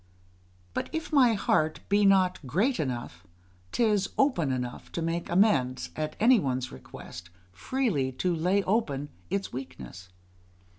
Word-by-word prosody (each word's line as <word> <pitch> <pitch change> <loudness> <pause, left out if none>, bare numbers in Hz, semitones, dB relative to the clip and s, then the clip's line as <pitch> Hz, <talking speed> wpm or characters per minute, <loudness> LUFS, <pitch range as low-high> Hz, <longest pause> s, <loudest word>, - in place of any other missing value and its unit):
But - - -3
if 320 0 -4
my 255 -5 +6
heart 155 -5 +1
be 205 +1 +3
not 185 -2 +3
great 215 - +1
enough, 120 - -4 0.5
'tis 210 -4 +2
open 215 - +2
enough 125 -1 -4
to - - -2
make 165 +1 -2
amends, 155 - +2
at 155 0 -3
any 235 +2 +6
one's 130 -5 -2
request, 85 +6 -11 0.2
freely 150 - -1
to 175 +7 0
lay 180 +5 +1
open 145 -10 -1 0.2
its 195 -1 -2
weakness. 90 - -8
170 Hz, 135 wpm, -28 LUFS, 130-205 Hz, 0.5 s, my